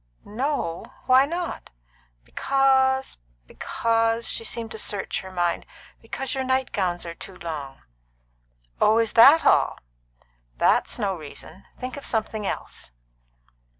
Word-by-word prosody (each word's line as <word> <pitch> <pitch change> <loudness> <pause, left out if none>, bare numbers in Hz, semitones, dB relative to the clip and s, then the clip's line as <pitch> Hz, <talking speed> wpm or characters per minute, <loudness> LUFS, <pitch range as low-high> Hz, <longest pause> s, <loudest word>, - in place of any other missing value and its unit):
"No? 230 - -2 0.2
Why 260 +2 +5
not?" 345 +2 -4 0.5
"Because 265 - +2 0.3
because" 230 - 0
she - - -1
seemed 225 0 -4
to 220 - -6
search 205 -1 -3
her 190 - -10
mind 175 -2 -1 0.3
"because 270 +1 -4
your 265 -1 -1
night 260 0 0
gowns 180 -3 -1
are 170 - -5
too 190 +2 -10
long." 145 -6 -7 1.0
"Oh, 215 +1 +5
is 230 -1 +1
that 275 +8 +8
all? - - +4 0.8
That's - - +2
no 200 -4 -1
reason. 160 +4 -10
Think 255 +2 -6
of 280 - -8
something 220 -2 -2
else." - - -5
225 Hz, 125 wpm, -24 LUFS, 190-265 Hz, 1.0 s, that